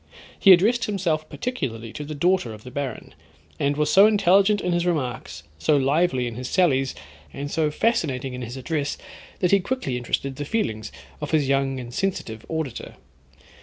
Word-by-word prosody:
He 195 Hz, -, +7 dB
addressed 220 Hz, +7 st, +5 dB
himself 170 Hz, -7 st, -1 dB
particularly 115 Hz, -, -4 dB
to 150 Hz, -, -5 dB
the 150 Hz, +1 st, -6 dB
daughter 170 Hz, -7 st, +1 dB
of 105 Hz, -, -15 dB
the 125 Hz, -, -10 dB
baron, 135 Hz, -3 st, -5 dB, 0.5 s
and 145 Hz, +1 st, +1 dB
was 150 Hz, 0 st, +1 dB
so 200 Hz, +2 st, +8 dB
intelligent 200 Hz, 0 st, +4 dB
in 180 Hz, -, -1 dB
his 175 Hz, 0 st, +1 dB
remarks, 145 Hz, -10 st, -2 dB, 0.2 s
so 150 Hz, -, +3 dB
lively 140 Hz, -1 st, +2 dB
in 120 Hz, -, -4 dB
his 125 Hz, 0 st, -5 dB
sallies, 135 Hz, -8 st, +2 dB, 0.4 s
and 145 Hz, +1 st, -6 dB
so 155 Hz, -1 st, +1 dB
fascinating 140 Hz, -, 0 dB
in 125 Hz, -, -6 dB
his 120 Hz, +2 st, -6 dB
address, 145 Hz, +1 st, -2 dB, 0.4 s
that 180 Hz, -, +2 dB
he 200 Hz, -, +6 dB
quickly 180 Hz, -, -2 dB
interested 130 Hz, +2 st, -2 dB
the 145 Hz, -, -3 dB
feelings 110 Hz, -, -2 dB, 0.3 s
of 150 Hz, -, -4 dB
his 155 Hz, -4 st, +2 dB
young 135 Hz, -1 st, +1 dB
and 120 Hz, -1 st, -8 dB
sensitive 120 Hz, -, -3 dB
auditor. 160 Hz, -6 st, -4 dB
150 Hz, 175 wpm, -24 LUFS, 130-180 Hz, 0.5 s, so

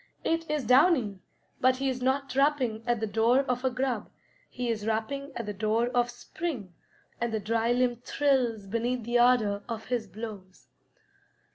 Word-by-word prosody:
It 330 Hz, -1 st, -1 dB
is 300 Hz, -2 st, 0 dB
Downy, 250 Hz, -, +4 dB, 0.4 s
but 255 Hz, 0 st, +3 dB
he 270 Hz, +1 st, -1 dB
is 255 Hz, -1 st, -2 dB
not 270 Hz, +1 st, 0 dB
rapping 265 Hz, -6 st, +2 dB
at 240 Hz, -1 st, +2 dB
the 220 Hz, -, -1 dB
door 230 Hz, +5 st, +3 dB
of 250 Hz, -2 st, -2 dB
a 260 Hz, -, +3 dB
grub; 255 Hz, -3 st, -2 dB, 0.4 s
he 250 Hz, -1 st, -4 dB
is 220 Hz, -2 st, -2 dB
rapping 275 Hz, +6 st, -2 dB
at 235 Hz, -, -4 dB
the 210 Hz, -, -4 dB
door 220 Hz, +4 st, +1 dB
of 245 Hz, -1 st, +1 dB
spring, 250 Hz, -, -5 dB, 0.5 s
and 235 Hz, -1 st, -1 dB
the 220 Hz, -, -1 dB
dry 225 Hz, +3 st, 0 dB
limb 245 Hz, -1 st, +2 dB
thrills 245 Hz, -4 st, 0 dB
beneath 235 Hz, +4 st, -1 dB
the 240 Hz, +2 st, +1 dB
ardor 230 Hz, -5 st, +4 dB
of 225 Hz, -1 st, -4 dB
his 240 Hz, -4 st, -1 dB
blows. 200 Hz, -2 st, -9 dB
240 Hz, 170 wpm, -28 LUFS, 220-260 Hz, 0.5 s, Downy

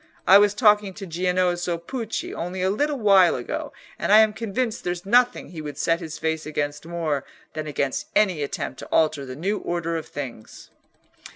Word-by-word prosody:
I 195 Hz, +2 st, +8 dB
was 205 Hz, 0 st, +3 dB
talking 210 Hz, -4 st, +3 dB
to 200 Hz, -, -7 dB
Giannozzo 180 Hz, 0 st, 0 dB
Pucci 225 Hz, +6 st, -5 dB
only 180 Hz, +2 st, -4 dB
a 190 Hz, -, +2 dB
little 290 Hz, +7 st, 0 dB
while 195 Hz, -6 st, +5 dB
ago, -, -, -4 dB, 0.3 s
and -, -, -1 dB
I 210 Hz, -, +9 dB
am 215 Hz, -1 st, +3 dB
convinced 225 Hz, +2 st, -3 dB
there's 175 Hz, 0 st, -3 dB
nothing 245 Hz, +4 st, +3 dB
he 165 Hz, -3 st, -7 dB
would 145 Hz, -2 st, -7 dB
set 165 Hz, 0 st, +1 dB
his 160 Hz, -3 st, -7 dB
face 160 Hz, 0 st, -2 dB
against 145 Hz, 0 st, -3 dB
more 160 Hz, -5 st, -2 dB, 0.3 s
than 155 Hz, -1 st, -5 dB
against 140 Hz, -2 st, -2 dB
any 185 Hz, -7 st, +3 dB
attempt 140 Hz, -2 st, -4 dB
to -, -, -8 dB
alter 155 Hz, -3 st, +1 dB
the 130 Hz, -, -7 dB
new 195 Hz, +8 st, -1 dB
order 170 Hz, -1 st, -2 dB
of 160 Hz, -, -6 dB
things." 125 Hz, -6 st, -8 dB
175 Hz, 185 wpm, -24 LUFS, 155-205 Hz, 0.3 s, I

